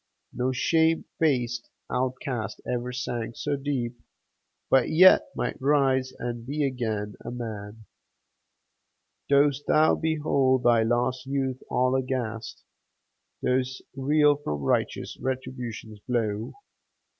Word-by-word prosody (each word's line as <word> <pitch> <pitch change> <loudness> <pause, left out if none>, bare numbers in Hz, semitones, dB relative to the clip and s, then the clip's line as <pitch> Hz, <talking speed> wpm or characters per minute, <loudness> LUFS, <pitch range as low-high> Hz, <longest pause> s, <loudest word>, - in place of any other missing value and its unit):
No 125 +1 0
shame 160 +5 +2
faced 125 -6 0 0.2
outcast 130 -2 -2
ever 125 0 -2
sank 120 -2 -4
so 145 -1 -1
deep, 130 -4 -3 0.7
But 130 -2 +4
yet 180 +4 +7
might - - -3
rise 135 -2 +2
and 120 -1 -4
be 145 +4 -2
again 110 -6 -2
a - - -5
man! 110 -3 -7 1.4
Dost 140 0 +3
thou 155 +1 +5
behold 140 -5 +1
thy 120 -1 +5
lost 125 +3 0
youth 135 -2 -1
all 125 +1 +2
aghast? 125 -4 -3 0.8
Dost 130 0 0
reel 145 +2 +3
from 75 - -4
righteous - - -1
Retribution's 125 -4 -5
blow? 110 -3 -1
130 Hz, 110 wpm, -26 LUFS, 120-140 Hz, 1.4 s, yet